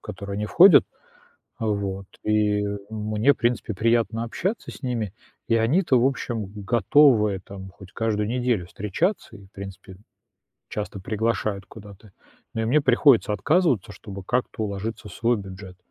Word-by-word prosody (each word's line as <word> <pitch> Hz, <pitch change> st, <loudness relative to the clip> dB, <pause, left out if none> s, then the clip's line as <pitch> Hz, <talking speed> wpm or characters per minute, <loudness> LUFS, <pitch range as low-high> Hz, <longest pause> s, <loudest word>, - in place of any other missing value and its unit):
которую 100 Hz, +1 st, -7 dB
они 105 Hz, +1 st, -2 dB
входят. 175 Hz, -, +7 dB, 0.7 s
А, 115 Hz, -, -2 dB
вот. 100 Hz, -2 st, -2 dB, 0.2 s
И 105 Hz, -1 st, +2 dB, 0.3 s
мне, 110 Hz, +5 st, +1 dB
в -, -, -28 dB
принципе, 120 Hz, -2 st, -1 dB
приятно 115 Hz, +1 st, +1 dB
общаться 190 Hz, -, -3 dB
с -, -, -12 dB
ними, 115 Hz, -7 st, -2 dB, 0.4 s
и 115 Hz, -, +3 dB
они-то, 130 Hz, +3 st, +3 dB
в 125 Hz, -, +4 dB
общем, 120 Hz, -5 st, -2 dB, 0.2 s
готовы 110 Hz, -2 st, +4 dB
там 95 Hz, -1 st, -9 dB
хоть 95 Hz, 0 st, -15 dB
каждую 105 Hz, -2 st, -1 dB
неделю 120 Hz, -5 st, 0 dB
встречаться 105 Hz, -, -2 dB
и, 100 Hz, -, -15 dB
в 95 Hz, -, -27 dB
принципе, 95 Hz, -1 st, -10 dB, 0.7 s
часто 105 Hz, -1 st, -5 dB
приглашают 105 Hz, -1 st, -2 dB
куда-то. 100 Hz, -1 st, -14 dB, 0.4 s
Но 115 Hz, -, -1 dB
и -, -, -1 dB
мне 145 Hz, +6 st, +3 dB
приходится 125 Hz, -3 st, +4 dB
отказываться, 135 Hz, -, +1 dB
чтобы 100 Hz, -1 st, -9 dB
как-то 125 Hz, -1 st, -1 dB
уложиться 105 Hz, +2 st, -5 dB
в 95 Hz, -, -10 dB
свой 115 Hz, +2 st, +1 dB
бюджет. 95 Hz, -1 st, -10 dB
110 Hz, 150 wpm, -24 LUFS, 100-120 Hz, 0.7 s, входят